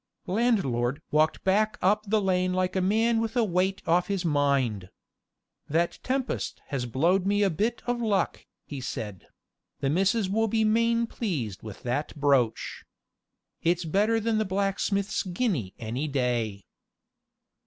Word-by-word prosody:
Landlord 180 - +1
walked 155 +1 +2
back 215 +3 +2
up 210 +3 +2
the 215 +2 +3
lane 185 -2 +1
like 185 0 0
a 190 - +2
man 225 +4 +2
with 225 +2 -2
a 240 - +4
weight 190 0 0
off 175 +2 +2
his 195 -3 -2
mind. 140 - +1 0.8
"That 170 +3 0
tempest 260 0 -2
has 130 -4 -2
blowed 175 +10 +2
me 205 +1 +3
a 195 - +3
bit 215 +9 -1
of 240 0 -1
luck," 210 -4 0 0.2
he 140 -3 -6
said; 105 -7 -6 0.5
"the 135 - 0
missus 195 +5 +2
will 225 +4 +1
be 220 +1 +1
main 230 +2 +2
pleased 150 - -3
with 110 -3 -10
that 130 +5 -2
brooch. 140 -6 +1 0.8
It's 175 +1 +1
better 210 +7 +2
than 225 0 0
blacksmith's 200 +1 0
guinea 180 - -2
any 120 +6 -3
day." 120 -7 -1
185 Hz, 145 wpm, -27 LUFS, 140-215 Hz, 0.8 s, a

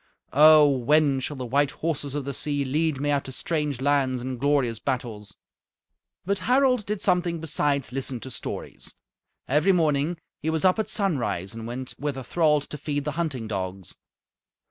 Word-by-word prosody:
Oh! 155 +1 +8
when 140 +1 +3
shall 140 +3 -4
the 130 - -4
white 140 +3 +2
horses 150 -2 -3
of 145 -2 -3
the 140 - -3
sea 145 +1 -2
lead 150 +1 0
me 145 +1 0
out 140 -1 0
to 130 - -7
strange 145 -1 -2
lands 135 -2 +2
and 125 0 -5
glorious 135 -5 +1
battles?" 115 -6 -4 0.9
But 200 +2 0
Harald 250 +2 +2
did 210 -1 -2
something 175 -3 +1
besides 145 -4 0
listen 130 -1 -3
to 130 - -7
stories. 115 - -5 0.5
Every 150 +8 +3
morning 155 -1 +1 0.2
he 155 - -2
was 160 +2 0
up 185 +3 +4
at 220 - -1
sunrise 125 - -1
and 115 0 -7
went 125 +2 -5
with 145 -2 -2
a 130 - -5
thrall 150 +2 +2
to 150 - -8
feed 145 -1 -2
the 150 - -1
hunting 145 -7 -3
dogs. 95 -3 -5
145 Hz, 175 wpm, -25 LUFS, 130-155 Hz, 0.9 s, Oh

